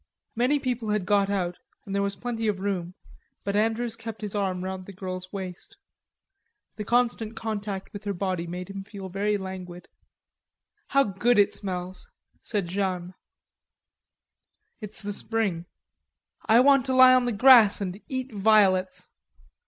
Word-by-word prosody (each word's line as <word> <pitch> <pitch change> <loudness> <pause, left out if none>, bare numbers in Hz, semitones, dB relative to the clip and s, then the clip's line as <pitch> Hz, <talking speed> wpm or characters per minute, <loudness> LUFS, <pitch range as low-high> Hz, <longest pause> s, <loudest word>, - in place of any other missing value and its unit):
Many 250 +5 +2
people 250 -5 -3
had 210 -3 0
got 200 0 +2
out 180 -3 -2 0.3
and 195 - -6
there 200 - +1
was 200 0 -1
plenty 230 -1 -3
of 205 -3 0
room, 185 -3 -3 0.5
but 200 0 -2
Andrews 225 +2 0
kept 225 -1 -8
his 210 -2 -5
arm 190 -3 -1
round 190 0 -5
the 200 - -9
girl's 185 -1 -6
waist. 190 - -7 1.0
The 210 - -3
constant 235 0 0
contact 205 -4 -5
with 205 0 -8
her 200 - -1
body 185 -2 -2
made 180 +1 -6
him 195 0 -6
feel 195 -2 -9
very 205 +3 0
languid. 185 -2 -8 1.0
"How 275 0 +4
good 235 +2 +1
it 205 -1 +4
smells!" 185 -1 -5 0.3
said 205 -5 -2
Jeanne. 185 -1 -2 1.7
"It's 210 -1 -2
the 205 0 -3
spring." 200 -6 -2 0.8
"I 225 +2 +6
want 275 -1 +4
to 260 - 0
lie 255 0 +8
on 255 -1 +4
the 245 - 0
grass 230 -2 +7
and 195 0 -5
eat 260 -2 -4
violets.... 195 -3 +3
200 Hz, 150 wpm, -26 LUFS, 185-225 Hz, 1.7 s, lie